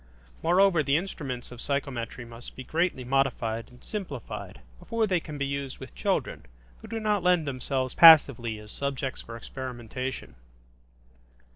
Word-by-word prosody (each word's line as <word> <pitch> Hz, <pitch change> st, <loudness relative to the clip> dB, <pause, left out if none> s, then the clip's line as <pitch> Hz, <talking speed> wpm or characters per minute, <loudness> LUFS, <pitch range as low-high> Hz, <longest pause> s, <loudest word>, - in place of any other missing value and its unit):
Moreover, 180 Hz, 0 st, +4 dB
the 140 Hz, 0 st, +2 dB
instruments 140 Hz, -10 st, -5 dB
of 120 Hz, -1 st, -9 dB
psychometry 130 Hz, -4 st, -3 dB
must 115 Hz, +1 st, -11 dB
be 130 Hz, -, -7 dB
greatly 165 Hz, -3 st, 0 dB
modified 125 Hz, -4 st, 0 dB
and 125 Hz, 0 st, -18 dB
simplified 170 Hz, -, -6 dB, 0.2 s
before 230 Hz, -1 st, 0 dB
they 185 Hz, -4 st, +1 dB
can 155 Hz, -2 st, -8 dB
be 140 Hz, -, -1 dB
used 140 Hz, -1 st, -4 dB
with -, -, -10 dB
children, -, -, -2 dB, 0.3 s
who -, -, -10 dB
do 225 Hz, -, -3 dB
not 210 Hz, -2 st, +1 dB
lend 180 Hz, -2 st, +3 dB
themselves 130 Hz, -1 st, -2 dB
passively 140 Hz, -9 st, +7 dB
as 105 Hz, 0 st, -11 dB
subjects 135 Hz, -1 st, -3 dB
for 115 Hz, 0 st, -8 dB
experimentation. 130 Hz, -, -6 dB
135 Hz, 145 wpm, -28 LUFS, 120-165 Hz, 0.3 s, passively